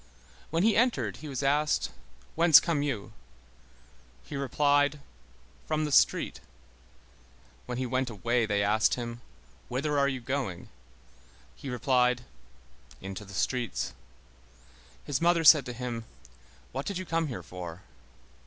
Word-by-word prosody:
When 165 Hz, +4 st, +1 dB
he 220 Hz, +1 st, +4 dB
entered, 245 Hz, +2 st, +1 dB
he 155 Hz, -, -9 dB
was 140 Hz, -1 st, -4 dB
asked: 145 Hz, +2 st, +1 dB, 0.4 s
"Whence 165 Hz, -1 st, +8 dB
come 165 Hz, -4 st, -1 dB
you?" 115 Hz, -7 st, -3 dB, 1.1 s
He -, -, -8 dB
replied: 145 Hz, +2 st, +2 dB, 0.7 s
"From 155 Hz, 0 st, 0 dB
the 150 Hz, -, -3 dB
street." -, -, +3 dB, 1.3 s
When 125 Hz, -1 st, -4 dB
he 130 Hz, -, -1 dB
went 130 Hz, +1 st, -1 dB
away, 115 Hz, +2 st, 0 dB
they 100 Hz, -1 st, +1 dB
asked 105 Hz, +2 st, +3 dB
him: 120 Hz, -1 st, -6 dB, 0.5 s
"Whither 140 Hz, +3 st, 0 dB
are 140 Hz, -, +3 dB
you 130 Hz, -2 st, -3 dB
going?" 125 Hz, -7 st, -4 dB, 0.9 s
He 140 Hz, -, -8 dB
replied: 125 Hz, 0 st, +2 dB, 0.8 s
"Into 95 Hz, +2 st, -7 dB
the 100 Hz, 0 st, -11 dB
streets." 125 Hz, +3 st, -1 dB, 1.1 s
His 145 Hz, -1 st, -2 dB
mother 170 Hz, -1 st, +3 dB
said 150 Hz, -3 st, +7 dB
to -, -, -4 dB
him: 120 Hz, -2 st, -5 dB, 0.7 s
"What 135 Hz, +2 st, -4 dB
did 200 Hz, -, -2 dB
you 185 Hz, -, -5 dB
come 165 Hz, -1 st, 0 dB
here 130 Hz, -, -6 dB
for?" 90 Hz, -1 st, -8 dB
130 Hz, 135 wpm, -29 LUFS, 120-150 Hz, 1.3 s, Whence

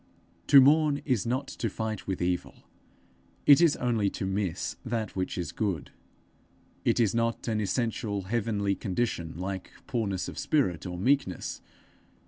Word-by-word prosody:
To 140 Hz, -, +9 dB
mourn 145 Hz, +1 st, +4 dB
is 125 Hz, -5 st, 0 dB
not 130 Hz, +3 st, -1 dB
to 115 Hz, -, -3 dB
fight 110 Hz, 0 st, -4 dB
with 95 Hz, -2 st, -2 dB
evil; 90 Hz, 0 st, -1 dB, 0.9 s
it 145 Hz, +2 st, +8 dB
is 165 Hz, -4 st, +5 dB
only 115 Hz, -5 st, +1 dB
to 95 Hz, -, -4 dB
miss 95 Hz, -2 st, -2 dB
that 115 Hz, -4 st, -3 dB
which 95 Hz, 0 st, -2 dB
is 90 Hz, -, -3 dB
good. 95 Hz, -8 st, -2 dB, 0.9 s
It -, -, +2 dB
is 110 Hz, -5 st, +3 dB
not 115 Hz, +1 st, -1 dB
an 110 Hz, -2 st, 0 dB
essential 105 Hz, -2 st, -1 dB
heavenly 105 Hz, -1 st, 0 dB
condition, 95 Hz, -5 st, -2 dB
like 95 Hz, +1 st, -4 dB, 0.2 s
poorness 105 Hz, -8 st, -2 dB
of -, -, -6 dB
spirit 95 Hz, -, 0 dB
or 90 Hz, 0 st, -5 dB
meekness. 115 Hz, -2 st, 0 dB
110 Hz, 145 wpm, -28 LUFS, 95-120 Hz, 0.9 s, To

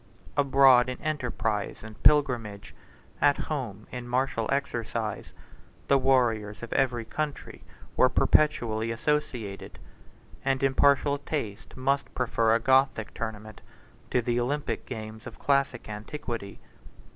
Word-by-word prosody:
Abroad 135 Hz, -3 st, +5 dB
in 125 Hz, -, -5 dB
enterprise 115 Hz, -10 st, -2 dB
and 110 Hz, -1 st, -11 dB
pilgrimage, 120 Hz, -9 st, +2 dB, 0.5 s
at 145 Hz, -, +4 dB
home 115 Hz, -9 st, -4 dB
in 125 Hz, -1 st, -6 dB
martial 125 Hz, -2 st, -1 dB
exercise, 115 Hz, -5 st, -2 dB, 0.6 s
the 140 Hz, -, +5 dB
warriors 120 Hz, -5 st, +1 dB
of 120 Hz, -, -5 dB
every 120 Hz, -4 st, +1 dB
country 150 Hz, +5 st, -5 dB, 0.3 s
were -, -, +5 dB
perpetually 115 Hz, -7 st, +2 dB
associated; 115 Hz, -4 st, -2 dB, 0.7 s
and 135 Hz, 0 st, 0 dB
impartial 140 Hz, +1 st, +3 dB
taste 130 Hz, -10 st, -5 dB
must 135 Hz, +2 st, -1 dB
prefer 115 Hz, -2 st, +2 dB
a -, -, +2 dB
Gothic 130 Hz, -2 st, +2 dB
tournament 110 Hz, -1 st, -6 dB, 0.5 s
to 125 Hz, -, +1 dB
the 120 Hz, +1 st, 0 dB
Olympic 125 Hz, -1 st, -2 dB
games 110 Hz, +1 st, -7 dB
of -, -, -10 dB
classic 140 Hz, -1 st, 0 dB
antiquity. 110 Hz, -1 st, -6 dB
125 Hz, 115 wpm, -27 LUFS, 110-140 Hz, 0.7 s, Abroad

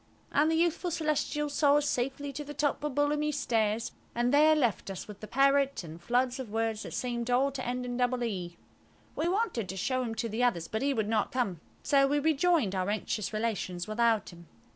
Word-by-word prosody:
And 300 Hz, +2 st, +3 dB
the 325 Hz, -, +2 dB
youthful 340 Hz, +2 st, +1 dB
Celestial 305 Hz, -2 st, -1 dB
saw 285 Hz, 0 st, +3 dB
us 295 Hz, 0 st, +2 dB
safely 275 Hz, +3 st, -2 dB
to 295 Hz, +2 st, -5 dB
the 295 Hz, 0 st, -9 dB
top 290 Hz, 0 st, 0 dB
of 295 Hz, -3 st, -2 dB
Bullamy's 295 Hz, 0 st, +1 dB
Stairs, 220 Hz, -2 st, 0 dB, 0.2 s
and 240 Hz, +1 st, +1 dB
left 290 Hz, -8 st, +3 dB
us 195 Hz, -, -5 dB
there -, -, -18 dB
with 205 Hz, -, -21 dB
the 215 Hz, -, -8 dB
parrot 275 Hz, -1 st, +2 dB
and 165 Hz, 0 st, -10 dB
floods 245 Hz, +6 st, +1 dB
of 255 Hz, -4 st, -5 dB
words 225 Hz, 0 st, -1 dB
that -, -, -6 dB
seemed 240 Hz, -1 st, -2 dB
all 260 Hz, +3 st, +3 dB
to 265 Hz, -1 st, -5 dB
end 250 Hz, +1 st, -2 dB
in 245 Hz, -1 st, -3 dB
double 250 Hz, 0 st, +1 dB
"e". 180 Hz, -6 st, -4 dB, 0.6 s
We 320 Hz, -, 0 dB
wanted 365 Hz, -, -1 dB
to 190 Hz, -, -5 dB
show 255 Hz, +7 st, 0 dB
him 230 Hz, -3 st, -3 dB
to 225 Hz, +1 st, -2 dB
the 225 Hz, +2 st, -3 dB
others, 175 Hz, -10 st, +1 dB
but 220 Hz, -, -3 dB
he 280 Hz, +1 st, +2 dB
would 220 Hz, -3 st, 0 dB
not 215 Hz, -1 st, 0 dB
come, 200 Hz, -10 st, -1 dB, 0.2 s
so 275 Hz, -1 st, +4 dB
we 290 Hz, +2 st, +1 dB
rejoined 310 Hz, -, +2 dB
our 185 Hz, 0 st, -1 dB
anxious 215 Hz, 0 st, -2 dB
relations 215 Hz, -5 st, -2 dB
without 225 Hz, 0 st, +1 dB
him. 170 Hz, -1 st, -14 dB
245 Hz, 215 wpm, -30 LUFS, 220-290 Hz, 0.6 s, so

